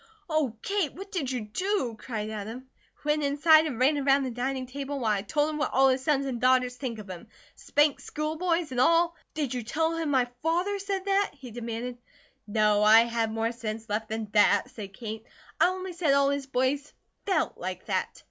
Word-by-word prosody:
"Oh, 305 -9 0
Kate, 395 -7 0
what 390 +2 -9
did 300 -9 -2
you 250 -2 -2
do?" 255 - -2
cried 215 -3 -4
Adam. 220 +5 -6 0.4
"Went 300 +1 +1
inside 310 +3 +5
and 260 -7 -4
ran 285 +3 +3
around 275 0 +3
the 260 - -3
dining 255 +2 -2
table 280 +2 -5
while 225 -4 +1
I 200 -2 +1
told 295 +9 0
him 305 - -4
what 300 - 0
all 270 +1 +5
his 260 0 0
sons 280 -2 +1
and 250 -4 -3
daughters 255 0 +3
think 250 -3 -5
of 210 -1 -9
him. 180 -2 -9 0.3
'Spanked 295 0 +1
school 305 +1 -3
boys' 335 -2 0
and 250 -1 +1
all 335 +3 +4
" - - -48
"Did 290 -5 -2
you 250 - -2
tell 320 +8 -1
him 325 -2 -2
my 260 -3 +3 0.2
father 355 +5 0
said 390 -1 -3
that?" 395 0 +1
he 260 -4 -11
demanded. 240 +1 -5 0.5
"No. 210 0 +3
I 215 +2 +8
had 230 -1 -1
more 225 +1 -1
sense 225 -2 -6
left 215 +2 -2
than 220 0 -3
that," 210 -1 +4
said 200 -3 -8
Kate. 220 +1 -6 0.4
"I - - +6
only 370 0 -4
said 330 -5 +2
all 280 0 +4
his 280 -1 -3
boys 270 +2 -1 0.3
FELT 380 - 0
like - - -5
that. - - -2
265 Hz, 210 wpm, -27 LUFS, 230-310 Hz, 0.5 s, I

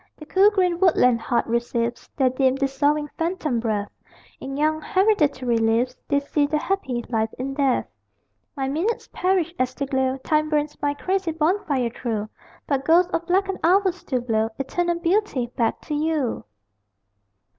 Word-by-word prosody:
The 305 - -11
cool 385 +6 +5
green 365 -4 +1
woodland 250 -10 +4
heart 240 0 0
receives 235 0 -2
Their 260 -3 +3
dim, 260 0 +2
dissolving, 285 +2 +1
phantom 325 -7 -1
breath; 215 -3 -2 0.5
In 270 +1 -6
young 310 +1 +1
hereditary 295 - +2
leaves 230 +3 +1
They 285 - +2
see 285 +1 0
their 305 +1 0
happy 270 -11 -2
life 220 -2 0
in 270 +2 -3
death. 270 -2 +1 0.7
My 270 -1 -1
minutes 340 +12 -2
perish 360 -3 +1
as 255 0 0
they 280 - -2
glow 265 -1 0
Time 305 +3 0
burns 300 -1 0
my 290 0 0
crazy 375 +2 -1
bonfire 305 - 0
through; 220 -3 -3 0.4
But 275 -2 -1
ghosts 345 +4 +4
of 335 -1 -2
blackened 385 +1 +1
hours 375 +2 +3
still 255 -8 -3
blow, 225 -2 0
Eternal 345 +5 -1
Beauty, 340 - 0
back 230 -2 0
to 305 - -6
you! 300 -4 -1
285 Hz, 155 wpm, -23 LUFS, 250-340 Hz, 0.7 s, cool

